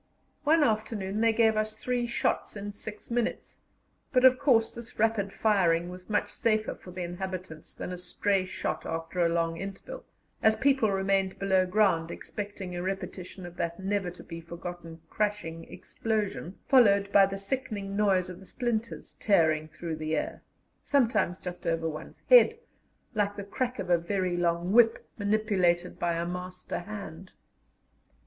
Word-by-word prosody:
One 315 +1 +5
afternoon 215 -4 0
they 230 0 +5
gave 225 -1 +3
us 215 0 -1
three 245 0 -1
shots 235 - -1
in 205 0 -5
six 210 +2 -8
minutes, 240 -1 -2 0.5
but, 255 0 +4
of 255 0 +7
course, 235 -6 +3
this 235 0 -10
rapid 215 -3 +1
firing 175 -6 +2
was 180 +2 -10
much 210 - 0
safer 215 -1 +1
for - - -14
the 180 0 -5
inhabitants 175 -2 -6
than - - -5
a 180 - -6
stray 190 +2 0
shot 185 - -3
after 165 +2 -2
a 170 - +3
long 165 0 0
interval, 195 - -7 0.4
as 220 0 +5
people 270 -4 +3
remained 195 0 +1
below 190 -1 +2
ground 180 -4 +2
expecting 200 -1 -6
a 175 - -3
repetition 185 -1 -5
of 175 0 -10
that 170 +1 -2
never 195 -1 -1
to 175 - -11
be 165 -1 -8
forgotten 170 0 -8
crashing 205 -5 -3
explosion, 210 -5 -3
followed 200 -6 +5
by 195 -1 +7
the 195 0 -4
sickening 200 -2 -3
noise 195 -3 +3
of 180 0 -8
the 190 - -15
splinters 235 -2 -3
tearing 160 -6 +2
through 160 +1 -5
the 155 0 -1
air, - - -3 0.4
sometimes 225 -10 +2
just 180 -1 -7
over 165 0 0
one's 155 -1 -8
head, 480 -2 +7 0.6
like 205 -2 0
the 200 - -5
crack 250 +5 -2
of 185 -3 -3
a 175 - +5
very 185 0 -1
long 175 +1 0
whip, 225 0 +4
manipulated 200 -4 +1
by 175 -1 +1
a 170 0 -1
master 180 +1 -5
hand. 190 -2 -8
195 Hz, 160 wpm, -29 LUFS, 175-215 Hz, 0.6 s, of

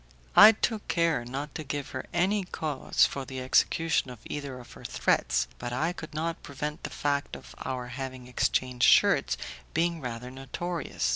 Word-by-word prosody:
I 220 - +11
took 220 0 -2
care 165 -6 +2
not 135 +4 -5
to 155 - -5
give 145 -1 -4
her 130 - -5
any 190 +4 +2
cause 155 -6 +1
for 140 - -3
the 130 0 -6
execution 150 +3 +2
of 125 - -8
either 140 -3 -5
of 120 - -13
her - - -13
threats, - - +1
but 120 - -4
I 155 +8 0
could 165 -3 -9
not 165 +2 -2
prevent 150 +2 -5
the - - -3
fact 145 -1 -1
of - - -12
our 125 -2 -4
having 130 0 -6
exchanged 125 0 +1
shirts - - +4 0.4
being 170 0 +1
rather 125 0 -5
notorious. 165 +6 -3
140 Hz, 170 wpm, -28 LUFS, 125-165 Hz, 0.4 s, I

